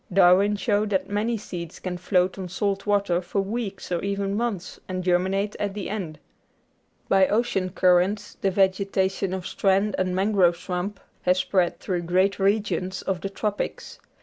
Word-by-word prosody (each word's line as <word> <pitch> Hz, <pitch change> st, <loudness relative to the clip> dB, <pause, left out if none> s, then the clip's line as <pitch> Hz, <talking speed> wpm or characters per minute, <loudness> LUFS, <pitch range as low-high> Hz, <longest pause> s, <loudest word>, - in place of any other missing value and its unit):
Darwin 190 Hz, +2 st, +5 dB
showed 205 Hz, 0 st, 0 dB
that 195 Hz, 0 st, -1 dB
many 220 Hz, +3 st, 0 dB
seeds 175 Hz, -5 st, -7 dB
can 185 Hz, -1 st, -4 dB
float 180 Hz, +1 st, +1 dB
on 185 Hz, -2 st, -6 dB
salt 200 Hz, +2 st, -2 dB
water 200 Hz, -4 st, +2 dB
for 185 Hz, +3 st, -2 dB
weeks 200 Hz, -2 st, -4 dB
or 175 Hz, -, 0 dB
even 200 Hz, 0 st, -1 dB
months 210 Hz, -5 st, -3 dB
and 185 Hz, -1 st, -3 dB
germinate 190 Hz, +3 st, +1 dB
at 205 Hz, -1 st, -2 dB
the 200 Hz, -2 st, -4 dB
end. 180 Hz, -8 st, -4 dB, 0.9 s
By 190 Hz, -1 st, +4 dB
ocean 205 Hz, -4 st, 0 dB
currents 185 Hz, +3 st, +2 dB
the 195 Hz, -, +2 dB
vegetation 190 Hz, 0 st, +1 dB
of 185 Hz, -1 st, -4 dB
strand 195 Hz, +1 st, +1 dB
and 185 Hz, -1 st, 0 dB
mangrove 190 Hz, -3 st, +3 dB
swamp 180 Hz, +3 st, -4 dB, 0.2 s
has 180 Hz, +1 st, +2 dB
spread 185 Hz, -1 st, +1 dB
through 180 Hz, -2 st, -2 dB
great 185 Hz, +4 st, +1 dB
regions 195 Hz, -2 st, 0 dB
of 185 Hz, -3 st, -2 dB
the 195 Hz, -, -3 dB
Tropics. 205 Hz, +1 st, -4 dB
195 Hz, 160 wpm, -25 LUFS, 180-205 Hz, 0.9 s, Darwin